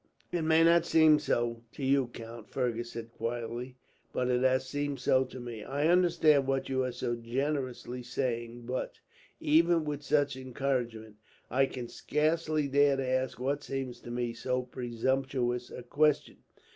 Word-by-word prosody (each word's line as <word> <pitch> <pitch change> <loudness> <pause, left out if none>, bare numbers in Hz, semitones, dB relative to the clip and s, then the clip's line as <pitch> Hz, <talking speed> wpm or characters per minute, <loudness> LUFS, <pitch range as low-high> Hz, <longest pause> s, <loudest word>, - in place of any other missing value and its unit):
"It 175 -1 0
may 160 +1 +4
not 170 +1 +5
seem 155 -2 +6
so 120 -5 -1
to 140 - -4
you, 135 -1 +3
count," 115 -1 -10
Fergus 120 -2 -2
said 115 0 -7
quietly; 120 +2 -4 0.3
"but 125 0 -1
it 125 0 +2
has 130 0 +3
seemed 145 +1 -2
so 130 0 +3
to 130 0 -9
me. 120 -3 -7
I 145 +6 0
understand 165 -6 +4
what 135 0 0
you 130 -1 +1
are 130 - -1
so 120 0 -2
generously 125 +1 -3
saying 120 -1 -3
but, 125 +2 -3 0.4
even 165 +1 +3
with 145 -1 -3
such 145 -1 +1
encouragement, 125 -4 -3 0.3
I 135 +2 +3
can 125 -3 -6
scarce 155 +6 0
dare 145 -2 +3
to 135 -1 -2
ask 130 -1 -1
what 140 +3 -1
seems 135 -2 -4
to - - -11
me 120 -1 -2
so 125 +1 -1
presumptuous 125 0 -1
a 125 - -8
question. 150 +3 +1
130 Hz, 160 wpm, -30 LUFS, 120-145 Hz, 0.4 s, seem